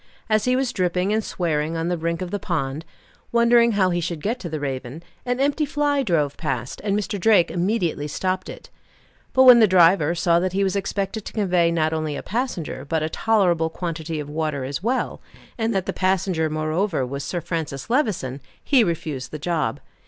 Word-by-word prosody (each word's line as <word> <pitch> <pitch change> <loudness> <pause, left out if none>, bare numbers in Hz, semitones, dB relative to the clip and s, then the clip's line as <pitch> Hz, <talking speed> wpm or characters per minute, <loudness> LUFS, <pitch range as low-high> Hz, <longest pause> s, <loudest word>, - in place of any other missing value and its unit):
As 215 -1 +3
he 250 0 +2
was 255 -1 0
dripping 180 +2 0
and 220 0 +1
swearing 160 -3 -1
on 165 +1 -2
the 175 - 0
brink 170 +1 -2
of 180 - -7
the 205 - -2
pond, 155 -4 -3 0.5
wondering 235 0 +4
how 190 -3 +2
he 175 0 0
should 165 -2 -4
get 230 +5 -1
to 175 - -6
the 155 -1 -4
Raven, 135 +2 -5 0.2
an 245 +1 0
empty 285 +3 +1
fly 290 -1 +1
drove 155 - 0
past, 125 -1 -4
and 205 -1 +1
Mr. 205 -1 -3
Drake 190 -2 +4
immediately 175 -5 -1
stopped 185 +5 -2
it; - - -11 0.6
but 260 - +5
when 250 -2 +9
the 220 - +6
driver 175 -3 +4
saw 170 0 +3
that 185 +1 -1
he 200 +1 +1
was 195 0 0
expected 200 +1 -2
to - - -7
convey 180 -5 +2
not 160 -1 +1
only 155 -2 -2
a - - -6
passenger, 210 - -3
but 155 +2 -1
a 155 - -1
tolerable 175 -5 +2
quantity 165 -2 -4
of 150 - -5
water 150 -2 -2
as 140 +4 -4
well, 245 +6 -1 0.3
and 225 -1 -1
that 190 -2 0
the - - -3
passenger, 185 -4 0
moreover, 155 0 -1
was 140 +2 -5
Sir 175 - -3
Francis 160 -5 -4
Levison, 210 - -1 0.2
he 265 -5 +4
refused 155 - -3
the 155 - -6
job. 150 -6 -1
175 Hz, 200 wpm, -23 LUFS, 155-210 Hz, 0.6 s, when